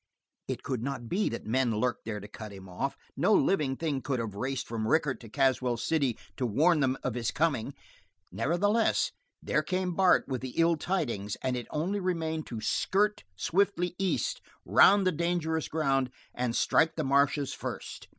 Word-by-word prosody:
It - - -4
could 130 -4 -2
not 125 -2 -4
be 205 +4 +1
that - - -6
men 120 0 +1
lurked 125 +4 -1
there 105 -2 -3
to 100 - -9
cut 105 0 -9
him 95 -1 -11
off. 95 +10 -3 0.2
No 200 +4 +3
living 150 -9 +2
thing 145 -3 -2
could 135 -1 -1
have 115 -4 -3
raced 130 +6 -3
from 110 -2 -3
Rickett 150 0 +2
to 115 - -12
Caswell 130 -1 +1
City 135 -1 0 0.2
to 125 - 0
warn 155 +9 +3
them 135 -1 +1
of 125 - -1
his 115 -1 -1
coming. 140 -3 0 0.6
Nevertheless, 205 +8 +1 0.3
there - - +1
came 185 -1 -1
Bart 185 +1 +4
with 130 -3 -3
the 130 -1 -6
ill 165 0 +4
tidings, 120 - -2
and 130 -1 0
it 120 - -5
only 180 +7 -1
remained 160 -4 -2
to 115 - -5
skirt 210 - +1
swiftly 180 - +1
east, 195 -1 0 0.2
round 200 -1 +6
the 185 - +4
dangerous 160 -1 -1
ground, 135 -5 +1 0.2
and 120 -1 -1
strike 160 0 +3
the 155 - -1
marshes 140 +1 +2
first. - - -6
140 Hz, 180 wpm, -29 LUFS, 125-170 Hz, 0.6 s, round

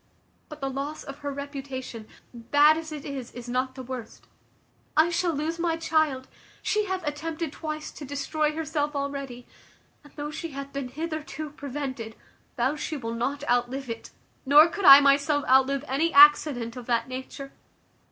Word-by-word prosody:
But 305 -1 -10
the 270 - -1
loss 280 +3 -5
of 275 0 -9
her 285 -1 -4
reputation, 270 -5 -7 0.3
bad 290 +6 +4
as 320 0 -6
it 300 -2 -7
is, 270 -4 -6
is 245 0 -9
not 255 +1 -1
the 260 - -7
worst; 250 -3 -8 0.7
I 320 +2 +5
shall 345 0 +1
lose 320 +3 -3
my 335 -1 0
child; 315 -5 0 0.4
she 425 0 +1
hath 375 -3 -3
attempted 310 +1 -3
twice 310 -1 -5
to - - -10
destroy 295 +2 -1
herself 300 -1 -2
already; 275 -3 -4 0.6
and 290 - -17
though 295 0 -5
she 315 0 -6
hath 275 0 -7
been 275 -2 -3
hitherto 310 +1 -5
prevented, 270 -6 -6 0.4
vows 260 +5 0
she 310 - -3
will 230 -3 -5
not 275 +5 -3
outlive 245 +1 0
it; 230 - -7 0.3
nor 295 +4 +7
could 400 +2 -4
I 275 +1 +11
myself 285 +1 +3
outlive 270 +2 +3
any 310 +6 +1
accident 285 -5 +6
of 250 -2 -9
that 235 0 +1
nature. 260 +2 -7
280 Hz, 165 wpm, -26 LUFS, 260-310 Hz, 0.7 s, I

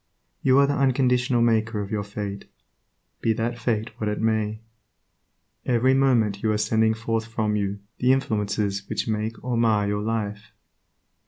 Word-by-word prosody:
You 130 0 +4
are 140 - +6
the 140 - 0
unconditional 125 -2 +2
maker 110 -1 +1
of 100 +1 -5
your 105 -1 -1
fate, 100 -1 -6 0.8
be 115 - +2
that 120 +1 -2
fate 115 -1 -1
what 105 - -1
it 105 - -2
may. 110 -1 0 1.0
Every 125 +1 +3
moment 120 -7 +2
you 110 - +1
are 105 - +1
sending 110 +1 +2
forth 115 0 -2
from 110 -2 -1
you 100 -1 -2 0.2
the 125 +1 +4
influences 105 -6 -1
which - - -2
will 110 - 0
make 110 +1 -5
or 125 -1 -1
mar 110 -3 +2
your 105 0 -1
life. 105 -1 -3
110 Hz, 165 wpm, -24 LUFS, 105-120 Hz, 1.0 s, are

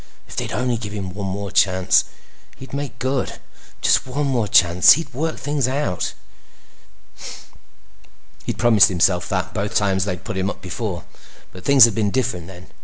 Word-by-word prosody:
If - - -11
they'd - - -4
only 125 +1 -1
give 105 -2 -7
him 95 -3 -5
one 100 0 -5
more 100 +1 -5
chance, 95 -1 +3 0.5
he'd 130 - -12
make 140 -3 -5
good. 130 +1 -2 0.5
Just - - +3
one 140 +3 -2
more 125 -6 0
chance. 90 -2 +6
He'd 150 -3 -5
work 155 +5 -3
things 145 -3 -1
out. 130 - -2 2.3
He'd - - -3
promised 115 -4 +5
himself 90 0 +1
that 95 -2 -2
both 105 +3 -3
times 95 -2 +1
they'd 90 -3 -4
put 110 -4 -5
him 95 +1 -1
up - - -7
before, 95 -1 -5 0.5
but 90 - -13
things 135 -4 +8
had 115 - 0
been 105 -1 0
different 95 -8 -2
then. 90 -1 -13
105 Hz, 170 wpm, -20 LUFS, 95-130 Hz, 2.3 s, things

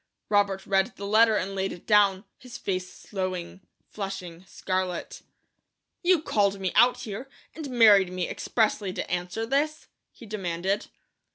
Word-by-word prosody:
Robert 200 -2 +2
read 195 +3 +1
the 200 - -7
letter 220 +2 +5
and 195 -1 -2
laid 195 0 -1
it 175 - -10
down, 205 -2 +4
his 250 -2 -10
face 185 -1 -3
slowing 185 -2 -5 0.3
flushing 190 -4 -6
scarlet. 185 -1 -3 0.8
"You 350 -3 +3
called 200 -5 +1
me 190 -2 -1
out 245 0 +4
here, 235 +3 -6 0.2
and 310 -3 -7
married 210 -7 +6
me 185 -1 -2
expressly 210 -4 0
to - - -5
answer 180 +5 -2
this?" 290 +5 -1 0.2
he 235 - -14
demanded. 195 -1 -2
200 Hz, 145 wpm, -26 LUFS, 185-225 Hz, 0.8 s, married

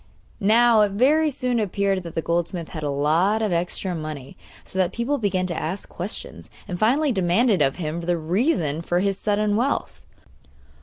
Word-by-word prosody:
Now 225 +2 +5
it 205 -2 +2
very 300 +8 +3
soon 250 -3 -1
appeared 200 -2 0
that 170 -2 -9
the 165 - -1
goldsmith 170 0 -2
had 155 - -6
a 145 - -2
lot 165 +10 +1
of 210 - 0
extra 180 +2 -1
money, 155 -5 -6 0.3
so 190 - -6
that 180 -2 +1
people 260 +5 -1
began 190 -4 0
to 175 -2 -3
ask 180 +6 -4
questions, 185 +5 -6 0.2
and 180 -3 -5
finally 275 +7 +3
demanded 190 0 +2
of 135 -1 +2
him 165 -1 -4
the 175 0 0
reason 165 - 0
for 175 +1 0
his 195 0 -1
sudden 210 0 +1
wealth. 250 +6 -1
190 Hz, 175 wpm, -23 LUFS, 170-220 Hz, 0.3 s, Now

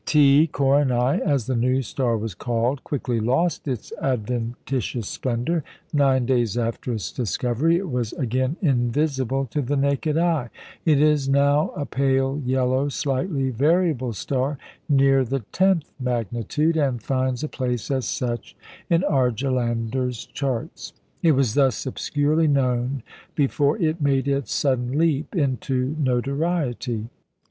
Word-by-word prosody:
T 150 +1 +5
Coronæ 135 -2 +2
(as 140 -8 0
the 130 - -1
new 130 +3 +1
star 120 +1 -1
was 110 -2 -4
called) 120 +7 -1
quickly 125 -5 -2
lost 135 +10 0
its 125 -5 -4
adventitious 120 -1 -2
splendour. 130 +6 -1 0.3
Nine 135 -3 +3
days 120 -3 +1
after 115 +1 -2
its 105 -7 -4
discovery 125 - 0
it 190 +1 -3
was 125 -6 -2
again 130 +3 -1
invisible 135 -1 +1
to 145 - 0
the 140 +2 -1
naked 140 +2 +1
eye. 165 -7 +1 0.4
It 155 -4 +4
is 150 -2 +3
now 140 +2 +3
a 145 - -3
pale 135 +1 0
yellow, 130 +2 +1
slightly 135 0 -1
variable 145 -1 +1
star 135 +6 -2 0.3
near 135 -1 +4
the 130 +2 -2
tenth 190 -4 +2
magnitude, 125 - -1
and 135 -6 0
finds 130 0 -1
a - - -1
place 125 -4 -3
as 130 -2 0
such 120 -3 -3 0.3
in 170 +1 +3
Argelander's 125 - 0
charts. 130 -5 -4 0.3
It 165 -2 +4
was 130 -5 +2
thus 135 -4 +2
obscurely 150 +4 +1
known 130 -2 0 0.3
before 145 +1 +2
it 160 -4 0
made 140 -1 +1
its 140 -1 -1
sudden 130 -1 0
leap 155 +1 +1
into 130 - 0
notoriety. 130 -3 -1
135 Hz, 135 wpm, -23 LUFS, 125-145 Hz, 0.4 s, T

